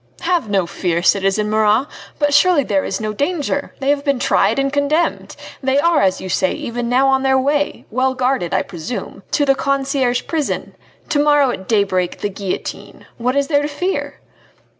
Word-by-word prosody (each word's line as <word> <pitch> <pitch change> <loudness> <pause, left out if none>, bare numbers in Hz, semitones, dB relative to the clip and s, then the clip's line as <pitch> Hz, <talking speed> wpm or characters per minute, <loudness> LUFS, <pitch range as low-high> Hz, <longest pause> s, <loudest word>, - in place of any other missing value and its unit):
"Have 345 - 0
no 195 -3 +1
fear, 170 0 -2
citizen 195 +2 +2
Marat! 215 +3 +2 0.3
But 290 -1 +1
surely 335 -1 +4
there 195 -5 0
is - - -3
no 215 -1 -3
danger! 285 - -2
They 275 +1 +1
have 285 -1 0
been 280 -2 +1
tried 245 - +2
and 275 0 0
condemned! 290 +4 0 0.3
They 265 0 +1
are, 320 0 +3
as 190 -1 +2
you 190 - -6
say, 185 0 +1
even 235 0 -4
now 260 +2 +3
on 265 0 +2
their 265 0 +3
way 290 +2 0
well 260 +3 +1
guarded, 250 -8 0
I - - +1
presume 175 +7 -7
to 290 - +1
the 275 - +4
Conciergerie 270 -2 0
prison! 315 -4 -3 0.4
to 305 -3 +1
morrow 290 -3 +4
at 190 -5 -7
daybreak, 195 -5 0
the 205 - -1
guillotine! 195 -1 -6
What 250 +3 0
is 280 0 +2
there 290 -2 +2
to 290 - -1
fear?" 360 +6 -3
265 Hz, 185 wpm, -18 LUFS, 210-285 Hz, 0.4 s, surely